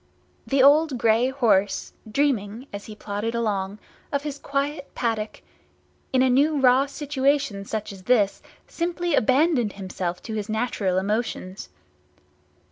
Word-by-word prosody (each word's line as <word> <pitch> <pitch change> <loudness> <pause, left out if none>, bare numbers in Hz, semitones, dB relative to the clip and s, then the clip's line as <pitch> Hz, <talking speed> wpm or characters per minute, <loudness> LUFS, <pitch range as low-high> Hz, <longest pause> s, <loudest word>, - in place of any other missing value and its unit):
The 270 -1 +3
old 290 0 +5
grey 230 +2 +3
horse, 220 -7 +1 0.2
dreaming, 235 -3 0
as 200 0 -6
he 215 - -9
plodded 210 +2 -4
along, 205 -3 -1 0.3
of 280 0 -1
his 290 -1 -5
quiet 280 +1 -2
paddock, 225 -3 -2 0.7
in 260 -1 +3
a - - +4
new 290 +3 +3
raw 265 +1 +5
situation 280 -6 0
such 215 0 -4
as 195 - -12
this 215 -6 +2 0.2
simply 345 0 -2
abandoned 260 - +3
himself 185 -2 -4
to 220 - -6
his 215 0 -4
natural 215 -4 0
emotions. 200 -1 -2
240 Hz, 130 wpm, -24 LUFS, 205-280 Hz, 0.7 s, old